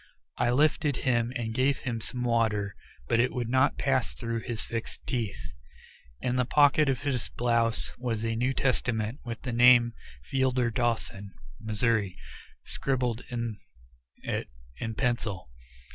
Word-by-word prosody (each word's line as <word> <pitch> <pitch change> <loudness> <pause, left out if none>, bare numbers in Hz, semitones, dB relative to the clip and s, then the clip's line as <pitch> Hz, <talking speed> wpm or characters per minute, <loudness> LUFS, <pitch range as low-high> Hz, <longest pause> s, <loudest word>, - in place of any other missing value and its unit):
I 120 - +3
lifted 145 +2 +2
him 120 -2 +2
and 110 -2 -2
gave 130 +3 +1
him 115 -3 -3
some 125 +3 -3
water, 110 -4 +1 0.3
but 115 - +2
it 125 - +3
would 120 -2 -2
not 130 +2 +3
pass 130 -3 +1
through 115 -1 -3
his 115 -1 -3
fixed 115 -1 -5
teeth. 115 -5 -3 0.7
In 125 0 0
the 125 - +3
pocket 145 +2 +4
of 130 -3 -1
his 130 -5 -1
blouse 115 -2 +1
was 115 -3 -2
a 115 0 0
New 125 +3 0
Testament 120 -1 0
with 115 -2 -6
the 125 -2 -3
name 120 0 +6 0.3
Fielder 130 - +1
Dawson, 105 -4 -2 0.2
Mo., 110 0 -5 0.9
scribbled 125 -3 -1
in 115 -3 -3 0.6
it - - -3 0.3
in 115 +7 -4
pencil. 110 - -1
120 Hz, 145 wpm, -28 LUFS, 115-130 Hz, 0.9 s, name